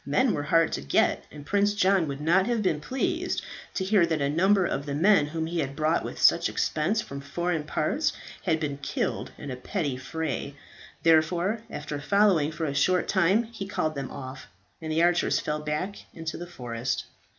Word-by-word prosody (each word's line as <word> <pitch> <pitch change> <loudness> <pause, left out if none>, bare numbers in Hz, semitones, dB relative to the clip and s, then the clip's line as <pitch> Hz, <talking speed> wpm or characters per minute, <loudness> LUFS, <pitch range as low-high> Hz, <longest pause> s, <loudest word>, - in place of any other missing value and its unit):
Men 215 - +2
were 145 - -1
hard 165 +2 +3
to - - -2
get, 70 - +1
and 145 -1 -10
Prince 205 +3 +2
John 190 -4 +3
would 140 -1 -4
not 175 +6 +3
have 235 -3 0
been 160 -6 +1
pleased 345 - -1 0.3
to 190 - 0
hear 195 -1 +4
that 160 -2 0
a 140 -1 +1
number 190 +4 +3
of 140 -3 -2
the 140 - -2
men 180 0 +4
whom 160 +1 -3
he 170 +1 -2
had 140 -2 -2
brought 155 +2 +1
with - - -6
such - - +5
expense 190 +9 0
from 140 0 -7
foreign 160 +2 -2
parts 280 - 0 0.3
had 160 -4 +2
been 145 -3 -3
killed 140 - -2
in 145 - -7
a - - -3
petty 140 0 -3
fray. 145 0 -4 0.5
Therefore 170 +6 +3
after 150 -5 -5
following 180 -2 +3
for 160 0 -3
a 140 - -2
short 180 +6 +2
time 190 +4 +3
he 220 -4 -7
called 160 -6 -1
them 140 -3 -5
off, 130 0 -8 0.3
and 160 -1 -4
the 160 +2 +2
archers 175 0 +3
fell 150 0 -2
back 150 +7 -3 0.2
into 160 -1 -5
the 175 - -6
forest. 125 -6 -3
160 Hz, 195 wpm, -27 LUFS, 145-190 Hz, 0.5 s, such